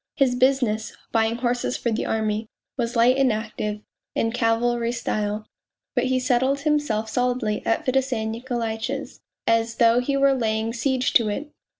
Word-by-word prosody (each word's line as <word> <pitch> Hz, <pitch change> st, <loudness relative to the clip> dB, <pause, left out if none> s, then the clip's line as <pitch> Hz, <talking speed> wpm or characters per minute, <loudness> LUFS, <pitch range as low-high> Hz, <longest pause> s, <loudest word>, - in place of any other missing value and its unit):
His 270 Hz, -3 st, +3 dB
business 250 Hz, -4 st, +1 dB, 0.2 s
bavins; 225 Hz, +1 st, +1 dB
horses 245 Hz, 0 st, 0 dB
for 235 Hz, -, -1 dB
the 225 Hz, -, -1 dB
army 220 Hz, 0 st, -1 dB, 0.3 s
was 240 Hz, -2 st, -2 dB
light 240 Hz, +3 st, +5 dB
and 270 Hz, -2 st, +4 dB, 0.7 s
;\< -, -, -65 dB
in 225 Hz, -, +1 dB
cavalry 235 Hz, 0 st, +1 dB
style, 215 Hz, -3 st, -2 dB, 0.5 s
but -, -, +1 dB
he 255 Hz, 0 st, +1 dB
settled 260 Hz, +2 st, +1 dB
himself 290 Hz, -8 st, 0 dB
solidly 245 Hz, -2 st, 0 dB
at 225 Hz, -, +1 dB
Fedosey 255 Hz, -3 st, 0 dB
Nikolaitch's, 230 Hz, -1 st, -4 dB, 0.2 s
as 230 Hz, 0 st, +2 dB
though 230 Hz, +1 st, +5 dB
he 275 Hz, +3 st, 0 dB
were 275 Hz, 0 st, +4 dB
laying 225 Hz, -2 st, -1 dB
siege 255 Hz, +1 st, 0 dB
to 225 Hz, -3 st, +4 dB
it 290 Hz, +8 st, -4 dB
240 Hz, 155 wpm, -24 LUFS, 225-255 Hz, 0.7 s, light